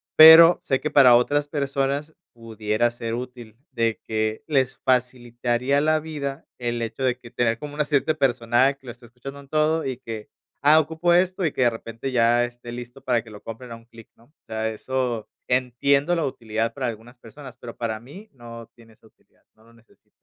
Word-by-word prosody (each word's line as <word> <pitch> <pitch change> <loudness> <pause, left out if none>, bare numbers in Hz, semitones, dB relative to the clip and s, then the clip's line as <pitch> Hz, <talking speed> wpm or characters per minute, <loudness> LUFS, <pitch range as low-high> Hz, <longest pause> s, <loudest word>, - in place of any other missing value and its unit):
pero 160 +2 +9
sé 135 - 0
que 150 - -3
para 130 -5 +7
otras 145 +4 0
personas 140 +1 -2 0.2
pudiera 115 0 -2
ser 115 -1 -5
útil 120 -2 -8
de 115 -3 -1
que 110 0 -2
les 135 -4 0
facilitaría 125 +1 0
la 155 +1 +2
vida 150 -2 -6
el 120 -1 -3
hecho 115 +3 -4
de 125 -1 0
que 120 - -13
tener 115 -1 0
como 145 +2 -8
una 150 - 0
cierta 145 +1 +1
persona 130 -2 +2
que 135 -1 -26
lo - - -5
esté 120 0 -18
escuchando 135 +4 -10
en 140 - -19
todo 155 +1 +1
y 130 -2 -3
que: 115 -4 -8 0.4
"Ah, 155 +2 +7
ocupo 160 +3 0
esto", 185 +1 +2
y 155 - +1
que 130 - -3
de 120 - +5
repente 115 +3 -7
ya 120 0 +3
esté 120 0 -10
listo 120 +2 -9
para 120 -2 +1
que 115 - -15
lo 105 -1 -13
compren 115 +2 -9
a - - -6
un 115 - -15
clic, 115 -1 -16
¿no?, 115 - -24
o 140 - -32 0.2
sea, 110 0 -2
eso 120 0 -3 0.2
entiendo 140 +6 +1
la 165 - -1
utilidad 115 -3 -3
para 130 -3 -3
algunas 115 +2 -8
personas, 130 +2 -12
pero 120 -2 -10
para 110 -2 -3
mí 185 - -13
no 115 -2 -11
tiene 115 -1 -19
esa 110 - -23
utilidad, - - -33
no 110 - -25
lo 115 - -21
necesito. 115 -1 -27
125 Hz, 205 wpm, -23 LUFS, 115-140 Hz, 0.4 s, pero